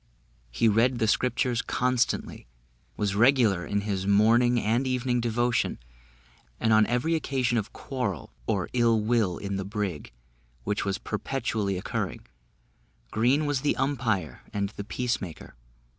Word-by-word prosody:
He - - +1
read 115 +4 +3
the 110 - +1
Scriptures 125 +1 +1
constantly, 125 - -1 0.5
was 105 -2 0
regular 110 -5 +3
in 100 0 0
his 100 -2 -2
morning 115 +4 +4
and 115 +5 +1
evening 125 -1 0
devotion, 120 +1 0 0.8
and 110 - +2
on 110 0 +5
every 125 +7 0
occasion 135 -6 0
of 105 - -6
quarrel 115 - -4
or - - 0
ill 115 -2 +3
will 105 -5 +1
in 100 -1 -4
the 95 - -2
brig, 100 - -4 0.5
which 105 - -1
was 100 0 -1
perpetually 110 -4 -2
occurring, 90 - -4 0.9
Green 125 +8 +2
was 145 -2 0
the 145 - +1
umpire 110 - -1
and 100 -1 -1
the 100 - -7
peace 125 +3 -2
maker. 85 -6 -8
115 Hz, 140 wpm, -27 LUFS, 100-125 Hz, 0.9 s, on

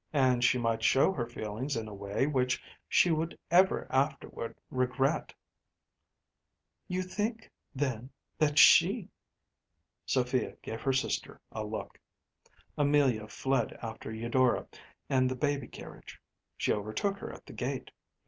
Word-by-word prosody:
And 130 -4 +3
she 125 - +4
might 115 -2 0
show 135 +10 +5
her 120 -10 -3
feelings 120 +4 -4
in 110 -1 -3
a 105 - -8
way 100 +5 -1
which 130 -3 +1 0.3
she 175 - +5
would 160 +1 -1
ever 185 +2 +4
afterward 135 -4 -1 0.2
regret.‚ÄĚ 130 +3 0 1.5
“You 185 0 -1
think, 210 +5 -3 0.2
then, 130 -3 -2 0.3
that 150 -1 +2
she - - +7
‚ÄĚ - - -19 1.0
Sophia 125 -1 0
gave 110 0 -5
her 135 - +1
sister 130 - -1
a 110 - -4
look. 110 +1 -6 0.8
Amelia 140 -7 +3
fled 135 +4 0
after 110 -1 -6
Eudora 120 +3 +1 0.4
and 130 -1 +3
the 130 - -2
baby 140 -1 -1
carriage. - - -11 0.4
She - - +1
overtook 110 - -2
her - - -6
at - - -12
the - - -11
gate. - - -4
130 Hz, 135 wpm, -31 LUFS, 115-145 Hz, 1.5 s, she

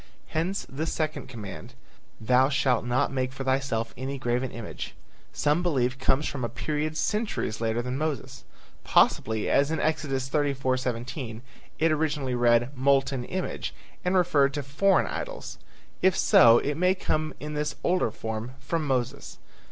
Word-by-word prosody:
Hence 175 +5 -1
the 155 +4 -4
second 155 -1 -2
command, 105 - -8 0.4
"Thou 125 +4 +4
shalt 130 -4 +2
not 125 +4 +1
make 130 -1 -1
for 135 +1 -6
thyself 130 -4 0
any 135 +2 -4
graven 125 0 -1
image," 115 -2 -7 0.4
some 150 +4 +1
believe 130 -7 0
comes 135 +2 +2
from 135 -3 -4
a 120 - -1
period 150 +6 -2
centuries 210 - -1
later 115 +1 0
than 125 +2 -3
Moses. 140 -4 -3 0.4
Possibly, 110 -1 +3
as 140 +1 +3
in 160 - -1
Exodus 135 -4 -1
34:17, 130 -4 -1 0.4
it 165 +1 +3
originally 150 -4 0
read 120 +2 +3
"molten 135 -1 +2
image" 185 +5 -4 0.3
and 180 +1 +1
referred 145 -6 +3
to 145 - -2
foreign 170 +9 +3
idols. - - -6 0.4
If 190 -1 +4
so, 115 -1 +7
it 145 +4 -1
may 180 +2 +3
come 155 -5 -1
in 150 +2 -5
this 150 -1 -2
older 180 -8 +2
form 110 +3 -5
from 150 +3 -2
Moses. 125 -3 -2
135 Hz, 150 wpm, -27 LUFS, 125-155 Hz, 0.4 s, so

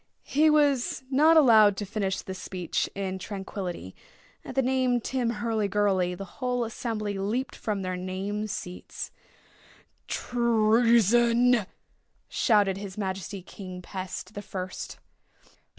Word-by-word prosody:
He 310 +3 +3
was 285 -4 +2
not 310 +5 +6
allowed 220 -8 +7
to 205 - -3
finish 200 -2 -2
this 190 0 -6
speech 180 -3 -2
in 190 -1 -3
tranquillity. 190 - -6 0.5
At - - -8
the 270 - +3
name 255 -1 +2
Tim 245 0 -1
Hurlygurly 205 -5 +1
the 195 - -6 0.2
whole 250 -1 0
assembly 215 -3 -3
leaped 225 +7 -2
from 205 -3 -3
their 185 0 -2
name 190 +3 -3
seats. 180 -3 -6 1.0
"Treason!" 235 0 +3 0.6
shouted 205 -5 +2
his 195 -1 -7
Majesty 190 -1 -4
King 185 -1 -9
Pest 185 +2 -6
the 205 - -5
First. 185 -2 -6
210 Hz, 120 wpm, -27 LUFS, 190-240 Hz, 1.0 s, allowed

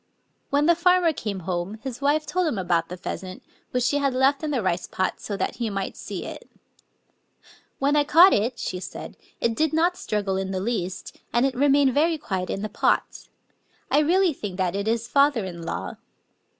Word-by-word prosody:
When 285 +1 +2
the 345 - +6
farmer 350 -1 +3
came 205 -8 -4
home 180 +4 -3
his 265 -1 -6
wife 295 +2 +2
told 365 -1 0
him 250 - -1
about 170 -3 0
the 180 - -6
pheasant, 185 +1 -6 0.3
which 250 -1 0
she 285 +4 +2
had 275 -2 0
left 270 +2 +3
in 310 - -1
the 260 -7 -1
rice 180 -1 -1
pot, 185 - -2
so 205 - -5
that - - -2
he 235 -2 -2
might 195 -1 -3
see - - -6
it. - - -9 1.3
"When 280 +2 +1
I 295 - +4
caught 335 +6 +7
it," 235 +4 0
she 180 - -4
said, - - -8 0.2
"it 230 - +1
did 315 +4 +1
not 340 +3 +2
struggle 205 - -2
in 190 0 -2
the 190 -1 -2
least; 190 -3 -4
and 240 +3 +3
it 270 - 0
remained 275 0 +3
very 320 +4 +2
quiet 190 -10 -3
in 195 - -3
the - - -1
pot. 210 - 0 0.6
I - - +5
really 350 +3 +3
think 200 -8 -6
that 185 -1 0
it 200 +1 -2
is 230 +1 0
father 280 -5 +3
in 175 -2 -7
law." 165 - -5
240 Hz, 200 wpm, -24 LUFS, 190-290 Hz, 1.3 s, caught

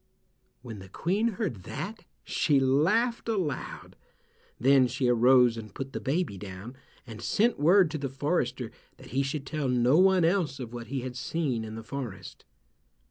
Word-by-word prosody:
When 115 -5 -8
the 95 0 -12
Queen 205 - 0
heard 180 - -3
that, 195 - -6 0.2
she 145 -3 +2
laughed 185 - +2
aloud. 185 -10 -3 0.6
Then 130 +1 +5
she 125 +1 -1
arose 125 0 +5
and 110 -3 -9
put 135 0 -6
the - - -3
baby 140 - -2
down, 100 +5 -8 0.3
and 115 -3 -9
sent 230 -2 +1
word 175 +2 +5
to 155 - -3
the 140 -1 -3
forester 135 -4 -2 0.3
that - - -14
he 135 +3 0
should 140 +1 -3
tell 150 -1 -2
no 125 +5 +3
one 190 -2 +5
else 165 -6 0
of 120 -2 -7
what 120 -1 -7
he 135 +2 -3
had 125 0 -6
seen 135 -3 -2
in 110 0 -7
the 115 - -7
forest. 120 -5 -7
135 Hz, 170 wpm, -28 LUFS, 120-165 Hz, 0.6 s, Then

